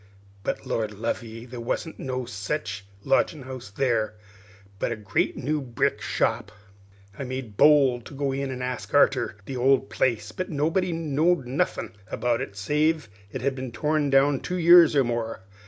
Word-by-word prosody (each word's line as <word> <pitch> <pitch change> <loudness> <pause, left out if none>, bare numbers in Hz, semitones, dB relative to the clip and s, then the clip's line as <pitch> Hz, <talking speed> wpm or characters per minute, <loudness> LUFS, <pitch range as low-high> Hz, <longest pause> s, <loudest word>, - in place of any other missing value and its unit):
But, - - -3
Lord 110 -2 -2
love 115 +3 -2
ye, 115 0 -9
there 125 -1 -8
wasn't 160 +7 -3
no 130 -1 -3
sech 105 +2 -4 0.2
lodgin' 150 -4 +2
house 130 -4 -8
there, 110 -2 0 0.6
but - - -1
a - - -1
great 105 -3 -1
new 150 +2 -1
brick 130 -2 -1
shop. 115 -1 0 0.7
"I - - -2
made 130 -4 -5
bold 135 -3 +5
to - - -10
go 140 0 -1
in 135 0 -2
an' 125 -1 -4
ask 125 -2 -4
arter - - +3
the 135 - -5
old 135 +1 +3
place, 110 -4 0
but 185 +10 -4
nobody 165 +5 0
knowed 165 -1 +1
nothin' 130 +4 -1
about 120 +2 0
it, 100 -6 -6
save 150 +5 +1
as - - -25 0.2
it - - -3
had 140 0 +1
been 130 -2 -6
torn 150 +4 0
down 135 0 +4
two 180 - -3
years 170 -2 +7
or 140 - +5
more. 115 -4 -3
130 Hz, 175 wpm, -26 LUFS, 115-145 Hz, 0.7 s, years